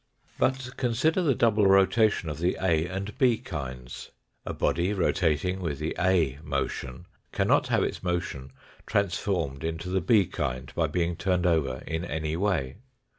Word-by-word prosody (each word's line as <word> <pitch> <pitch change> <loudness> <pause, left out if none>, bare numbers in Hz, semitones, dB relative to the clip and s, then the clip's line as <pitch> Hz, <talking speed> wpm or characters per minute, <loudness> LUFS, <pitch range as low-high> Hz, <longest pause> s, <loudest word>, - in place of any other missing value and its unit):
But 130 -1 0
consider 130 +9 +1
the 145 -7 +2
double 110 -4 +3
rotation 95 0 +4
of 75 0 -4
the 90 +2 0
A 85 -3 +1
and 100 +3 -5
B 125 -4 +4
kinds. 65 - -7 0.4
A - - -1
body 90 +4 0
rotating 90 -2 +1
with 80 -6 -3
the 75 +2 -3
A 85 -7 +2
motion 70 0 -4 0.3
cannot - - +2
have - - +2
its - - -3
motion 85 -7 -3 0.4
transformed 90 -7 -1
into 80 +2 -3
the 95 0 0
B 100 +3 +4
kind 65 -5 -4
by - - +1
being 85 -1 -1
turned 90 0 0
over 75 -7 +1
in 80 +1 -3
any 80 -2 -3
way. 85 -8 -1
90 Hz, 155 wpm, -27 LUFS, 80-100 Hz, 0.4 s, rotation